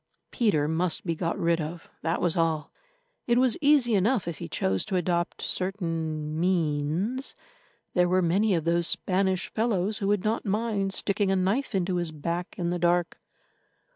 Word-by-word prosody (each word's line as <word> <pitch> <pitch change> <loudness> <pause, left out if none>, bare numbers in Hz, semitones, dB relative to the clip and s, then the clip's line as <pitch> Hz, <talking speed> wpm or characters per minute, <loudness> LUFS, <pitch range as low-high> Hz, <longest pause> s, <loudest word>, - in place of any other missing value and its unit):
—Peter 190 -11 +2
must 165 +3 +1
be 170 - 0
got 165 +1 -2
rid 170 0 +1
of, 165 +2 -6
that 165 +1 -1
was 175 -1 +1
all. 160 -3 0 0.6
It 240 0 +3
was 250 -2 +4
easy 280 -5 +4
enough 205 0 +2
if 165 -4 -4
he 85 - -6
chose 95 0 0
to 190 - -3
adopt 175 -1 -1
certain 165 -5 -2
means; 175 - 0 0.6
there 180 -1 +3
were 185 0 +3
many 195 +4 +2
of 165 - -1
those 170 +1 +2
Spanish 190 -1 0
fellows 215 -2 0
who 200 - -1
would 205 -2 +1
not 220 +2 0
mind 205 -1 -1
sticking 200 +1 0
a 195 - +3
knife 200 +7 0
into 185 -1 0
his 175 -2 -2
back 170 +4 -4
in 175 -1 -1
the 175 - -1
dark. 175 0 +1
180 Hz, 170 wpm, -27 LUFS, 165-200 Hz, 0.6 s, was